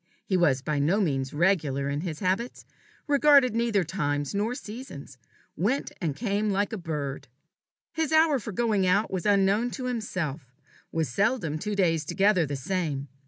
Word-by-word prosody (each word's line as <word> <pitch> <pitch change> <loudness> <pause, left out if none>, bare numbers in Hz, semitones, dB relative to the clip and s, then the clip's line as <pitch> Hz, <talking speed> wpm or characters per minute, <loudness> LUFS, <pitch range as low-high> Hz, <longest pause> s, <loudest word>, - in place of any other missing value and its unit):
He 190 - 0
was 145 -8 +2
by 150 0 -1
no 165 +9 +2
means 135 -8 0
regular 150 -5 +1
in 140 +1 -2
his 160 -3 -5
habits 195 +6 -2 0.4
regarded 285 -4 +5
neither 230 -4 +1
times 145 -5 -2
nor 215 +5 -1
seasons 210 - -9 0.4
went 220 - -1
and 155 -6 -1
came 210 0 -1
like 200 +2 0
a - - -2
bird. 150 -5 -4 0.6
His 320 -3 -2
hour 315 -3 +4
for 220 - -6
going 205 -2 +1
out 200 +4 +2
was 185 0 -2
unknown 200 +3 +3
to 255 - -5
himself, 175 - -4 0.4
was 160 -2 0
seldom 195 - 0
two 210 +3 -3
days 165 -5 +2
together 195 +1 +2
the 140 - -3
same. 145 -3 -3
190 Hz, 165 wpm, -27 LUFS, 150-220 Hz, 0.6 s, regarded